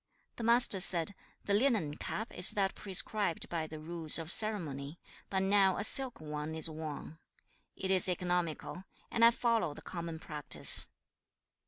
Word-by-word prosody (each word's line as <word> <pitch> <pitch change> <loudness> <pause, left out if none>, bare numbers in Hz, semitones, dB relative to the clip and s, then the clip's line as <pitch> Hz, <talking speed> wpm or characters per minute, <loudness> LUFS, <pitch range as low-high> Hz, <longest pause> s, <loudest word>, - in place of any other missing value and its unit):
The 235 - -6
Master 235 -3 +4
said, 180 0 +4 0.3
'The 200 - -1
linen 205 - 0
cap 220 - -6
is 180 - +8
that 195 -2 -1
prescribed 200 -2 0
by 165 -2 -4
the 155 0 -10
rules 160 0 +1
of 165 0 -2
ceremony, 165 -9 +1 0.3
but 190 -1 -1
now 195 -1 +2
a - - -3
silk 260 +2 -2
one 150 0 -6
is 160 - 0
worn. 155 0 -8 0.6
It 190 0 -4
is 185 -1 +4
economical, 180 0 -3 0.3
and 230 - 0
I 230 - +8
follow 230 -10 -1
the - - -12
common 170 -2 -7
practice. 150 -2 -1
180 Hz, 155 wpm, -31 LUFS, 160-205 Hz, 0.6 s, is